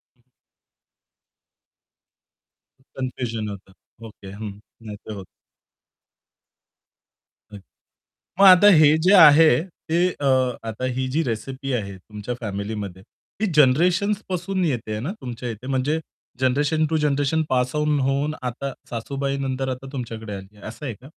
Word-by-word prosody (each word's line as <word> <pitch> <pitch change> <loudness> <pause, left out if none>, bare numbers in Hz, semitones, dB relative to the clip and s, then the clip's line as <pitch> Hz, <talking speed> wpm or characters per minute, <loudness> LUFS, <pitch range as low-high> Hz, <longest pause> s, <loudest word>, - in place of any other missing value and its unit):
हं 120 - -37 2.7
कन्फ्युजन 120 -4 -3
होतं. 95 -1 -10 0.3
ओके. 100 -3 -12
हं. 105 -1 -7 0.2
नाही 105 -2 -8
ते 110 - -9
होतं. 100 -2 -8 2.3
अ - - -7 0.8
मग 195 - +7
आता 185 +2 +8
हे 155 0 +6
जे 190 - +6
आहे, 155 -2 +8
ते 175 -1 -1
अ, 145 - -6 0.4
आता 110 +4 -4
ही 130 0 -1
जी 165 - +3
रेसिपी 130 +3 -4
आहे 100 -2 -7
तुमच्या 105 +5 -7
फॅमिलीमध्ये 100 -3 -5 0.4
ती 220 - +3
जनरेशन्सपासून 180 +6 +2
येतेय 110 -7 -2
ना 135 +11 -3
तुमच्या 120 -1 -6
इथे 115 +3 -8
म्हणजे 135 +4 0 0.4
generation 145 +5 +2
to 160 - +1
generation 150 +1 +1
pass 125 +1 0
on 150 -1 +1
होऊन 140 +3 0
आता 130 +2 -4 0.2
सासूबाई 135 +4 -3
नंतर 135 -1 -2
आता 130 +1 -5
तुमच्याकडे 115 -4 -6
आली, 95 +2 -11
असं 110 +6 -9
आहे 125 - -3
का? 130 +5 -16
130 Hz, 130 wpm, -23 LUFS, 110-150 Hz, 2.7 s, आता